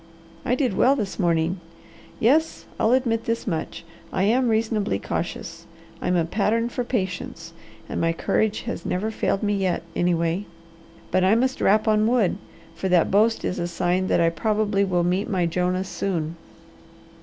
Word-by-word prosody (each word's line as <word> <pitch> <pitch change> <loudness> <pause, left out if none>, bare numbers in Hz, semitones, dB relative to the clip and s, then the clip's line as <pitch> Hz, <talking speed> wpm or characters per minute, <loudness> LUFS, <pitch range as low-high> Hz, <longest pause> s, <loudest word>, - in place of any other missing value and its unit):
I 250 - +1
did 255 -7 0
well 265 +7 +4
this 210 -7 -4
morning. 170 0 +1 0.6
Yes, 310 +8 +2
I'll 220 - +3
admit 235 -3 +1
this 230 0 -2
much: 165 -2 -4 0.3
I 185 - 0
am 245 +5 +3
reasonably 220 - 0
cautious, 100 - -5 0.3
I'm 180 - +1
a 170 -2 +2
pattern 220 +6 0
for 245 - -3
patience, 190 -7 -4 0.3
and - - -3
my 165 - +2
courage 210 +5 0 0.2
never 190 +4 -1
has - - -13
failed 195 - 0
me 205 0 +1
yet, 190 -4 0
anyway. 175 +2 0 0.6
But 185 - +2
I 190 +4 +5
must 260 +3 0
rap 215 +3 +3
on 215 0 +3
wood; 230 -6 +2 0.4
for 190 - -3
that 180 -2 +3
boast 220 +3 +3
is - - -2
a 175 - -1
sign 175 +2 0
that - - +2
I 165 0 +3
probably 205 +3 +1
will 180 -3 +1
meet 180 +4 0
my 185 -4 +1
Jonah 180 +2 0
soon." 170 -4 -3
195 Hz, 165 wpm, -24 LUFS, 175-225 Hz, 0.6 s, I